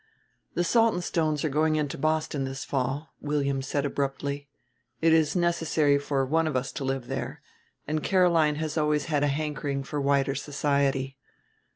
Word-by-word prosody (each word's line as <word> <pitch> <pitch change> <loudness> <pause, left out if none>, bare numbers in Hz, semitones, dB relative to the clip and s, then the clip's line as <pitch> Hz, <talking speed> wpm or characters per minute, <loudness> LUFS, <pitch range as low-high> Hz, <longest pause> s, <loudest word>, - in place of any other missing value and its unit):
"The 175 - +2
Saltonstones 175 -8 +1
are 155 - +1
going 155 +2 +2
into 150 -2 -1
Boston 155 -1 0
this 135 0 -5
fall," 135 +3 -2
William 140 -2 0
said 140 +1 -1
abruptly. 140 0 -3 0.5
"It 165 0 +4
is 160 0 +3
necessary 165 -4 +2
for 140 -1 0
one 160 +4 +1
of 155 - -2
us 130 +1 -1
to - - -5
live 135 -2 -2
there; - - -5 0.4
and 155 +1 -1
Caroline 170 -5 +3
has 155 +1 -2
always 150 -1 +1
had 150 -3 0
a - - +3
hankering 145 -1 -2
for 145 +1 -3
wider 140 -1 +2
society. 140 -2 0
145 Hz, 160 wpm, -27 LUFS, 140-155 Hz, 0.5 s, It